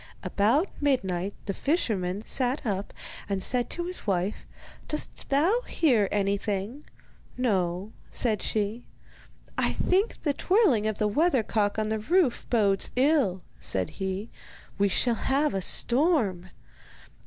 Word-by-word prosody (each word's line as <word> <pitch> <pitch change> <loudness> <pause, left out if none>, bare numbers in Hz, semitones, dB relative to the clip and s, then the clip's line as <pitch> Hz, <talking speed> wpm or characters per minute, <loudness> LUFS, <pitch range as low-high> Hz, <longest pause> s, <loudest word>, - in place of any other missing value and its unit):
About 235 - +2
midnight 195 -9 0
the 195 - -2
fisherman 205 - -1
sat 255 +1 -1
up, 200 -2 -2 0.4
and 195 -1 0
said 245 -1 +1
to 345 - -3
his 360 -8 -5
wife: 190 +1 -1 0.4
'Dost 300 - -4
thou 335 - +3
hear 240 - +2
anything?' 200 +5 -1 0.5
'No,' 195 -5 0 0.2
said 220 -5 -1
she. 215 +2 -2 0.7
'I - - +2
think 390 +5 0
the 290 - +1
twirling 295 - +3
of 215 -1 -2
the 210 - +1
weathercock 220 -6 +1
on 215 0 -1
the 220 0 -1
roof 315 - +1
bodes 200 -5 +2
ill,' 255 - +2 0.2
said 95 -1 +1
he; 190 +3 -3 0.5
'we 200 - +4
shall 240 +5 +1
have 275 +4 0
a 195 - -1
storm. 235 - +2
220 Hz, 130 wpm, -27 LUFS, 195-280 Hz, 0.7 s, we